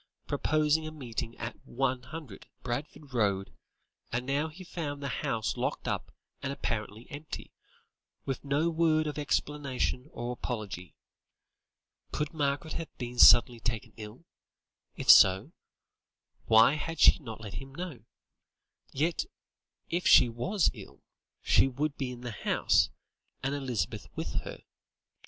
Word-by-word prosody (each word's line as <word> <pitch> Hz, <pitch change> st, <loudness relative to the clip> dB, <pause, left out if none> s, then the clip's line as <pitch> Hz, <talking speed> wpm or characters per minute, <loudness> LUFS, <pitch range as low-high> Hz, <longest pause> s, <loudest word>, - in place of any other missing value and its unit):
proposing 155 Hz, +1 st, +1 dB
a -, -, -6 dB
meeting 120 Hz, -6 st, -5 dB
at 115 Hz, +1 st, -5 dB
100, 130 Hz, -1 st, -4 dB, 0.2 s
Barford 140 Hz, +3 st, -5 dB
Road, 100 Hz, -5 st, 0 dB, 0.6 s
and 125 Hz, +1 st, -2 dB
now 140 Hz, +4 st, 0 dB
he 165 Hz, +4 st, -11 dB
found 155 Hz, -5 st, -5 dB
the 140 Hz, -, -2 dB
house 110 Hz, -1 st, -1 dB
locked -, -, -2 dB
up -, -, -3 dB, 0.3 s
and 140 Hz, -, -3 dB
apparently 110 Hz, -3 st, -4 dB
empty, 150 Hz, +2 st, -7 dB, 0.7 s
with 135 Hz, -, -3 dB
no 145 Hz, +3 st, +1 dB
word 160 Hz, -1 st, +2 dB
of 150 Hz, -1 st, -3 dB
explanation 140 Hz, -2 st, -1 dB
or 120 Hz, +1 st, -4 dB
apology. 105 Hz, -7 st, -5 dB, 1.2 s
Could 150 Hz, +1 st, -2 dB
Margaret 145 Hz, +1 st, -1 dB
have 165 Hz, -, -5 dB
been 120 Hz, -1 st, -6 dB
suddenly 120 Hz, 0 st, +8 dB
taken 115 Hz, -1 st, -3 dB
ill? 110 Hz, +8 st, -10 dB, 0.7 s
If -, -, -5 dB
so, 95 Hz, 0 st, +6 dB, 1.0 s
why 110 Hz, +4 st, +7 dB
had 160 Hz, +1 st, -4 dB
she -, -, +7 dB
not 115 Hz, -7 st, -8 dB
let 105 Hz, -3 st, -8 dB
him 135 Hz, 0 st, -12 dB
know? 175 Hz, -7 st, -6 dB, 0.9 s
Yet, 160 Hz, -, 0 dB, 0.7 s
if 175 Hz, +1 st, 0 dB
she 120 Hz, -, +8 dB
was 160 Hz, -, +1 dB
ill, -, -, -13 dB, 0.4 s
she -, -, +5 dB
would 140 Hz, +3 st, -2 dB
be 130 Hz, -2 st, -3 dB
in 120 Hz, -1 st, -9 dB
the 120 Hz, -1 st, -5 dB
house, 105 Hz, -, +2 dB, 0.5 s
and 135 Hz, +1 st, 0 dB
Elizabeth 135 Hz, -5 st, -3 dB
with -, -, -3 dB
her. -, -, -9 dB
135 Hz, 135 wpm, -30 LUFS, 120-150 Hz, 1.2 s, suddenly